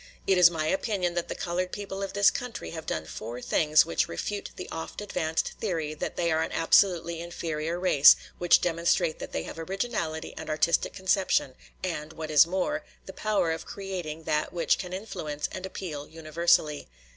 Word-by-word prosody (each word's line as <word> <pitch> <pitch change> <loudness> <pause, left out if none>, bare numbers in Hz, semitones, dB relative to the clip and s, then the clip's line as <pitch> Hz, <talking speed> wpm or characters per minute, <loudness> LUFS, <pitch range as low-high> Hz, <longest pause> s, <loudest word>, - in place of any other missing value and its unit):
It 190 -2 +3
is 175 -1 +9
my 160 -2 -2
opinion 190 0 0
that 175 -1 -2
the - - -4
colored 180 +1 -2
people 200 -1 -5
of 195 - -4
this 200 0 +5
country 245 -2 -5
have 160 -1 -7
done 80 -1 -2
four 115 +9 -7
things 155 +3 +4
which 80 - 0
refute 200 - -4
the 180 - -7
oft 165 0 -6
advanced 165 -6 -2
theory 165 -8 -2
that 155 - -4
they 170 -1 0
are 160 0 +2
an - - -2
absolutely 170 0 +3
inferior 170 -1 -3
race, 160 -6 +7 0.2
which 175 -1 +5
demonstrate 170 -1 +1
that - - -7
they 80 - -2
have 165 - -8
originality 180 -3 -3
and - - -7
artistic 155 +2 +1
conception, 190 -7 +1 0.3
and, 160 -4 -3
what 160 -1 -6
is 150 +1 +7
more, 190 - -1 0.2
the 190 - -9
power 200 -6 0
of 160 - -4
creating 180 -5 -5
that 155 -1 0
which 170 -1 +1
can 180 - -5
influence 155 -7 -4
and 185 0 -5
appeal 155 -7 -6
universally. 160 -1 +1
170 Hz, 180 wpm, -28 LUFS, 155-190 Hz, 0.3 s, is